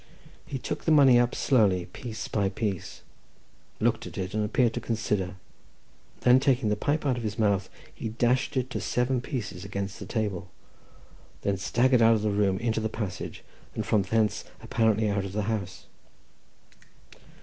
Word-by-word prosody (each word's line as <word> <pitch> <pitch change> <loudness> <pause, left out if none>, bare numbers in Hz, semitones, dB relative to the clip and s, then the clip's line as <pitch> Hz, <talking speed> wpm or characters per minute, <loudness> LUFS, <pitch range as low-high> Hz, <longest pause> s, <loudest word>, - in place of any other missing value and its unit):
He 140 -3 -3
took 125 - -5
the 160 - +3
money 135 -5 +7
up 120 0 +1
slowly, 100 -9 +3
piece 110 +5 -7
by 100 -2 0
piece, 100 -2 -4 0.8
looked - - +1
at - - -10
it, 95 0 -3
and 110 0 0
appeared 115 +2 +2
to - - -2
consider; 105 -5 -1 0.9
then 125 +1 +6
taking 130 -4 +2
the 105 - +2
pipe 145 +8 -1
out 130 -3 +1
of - - -4
his 105 -2 -3
mouth, 100 -3 +1 0.2
he 110 - -5
dashed 125 +5 +1
it 130 0 -1
to - - -3
seven 125 0 0
pieces 100 - -5
against 100 0 -4
the 100 - -7
table, 100 -5 -2 0.9
then 100 -1 +1
staggered 120 +5 +2
out 115 0 +6
of 105 - -2
the 105 - +1
room 100 -2 +2
into 115 +1 0
the 110 0 -1
passage, 100 -5 -5 0.3
and - - -2
from 105 - +3
thence 105 +2 +1 0.2
apparently 110 -1 +2
out 100 -1 0
of 95 -1 -6
the 105 0 -1
house. 100 -4 -3
110 Hz, 170 wpm, -27 LUFS, 100-120 Hz, 0.9 s, money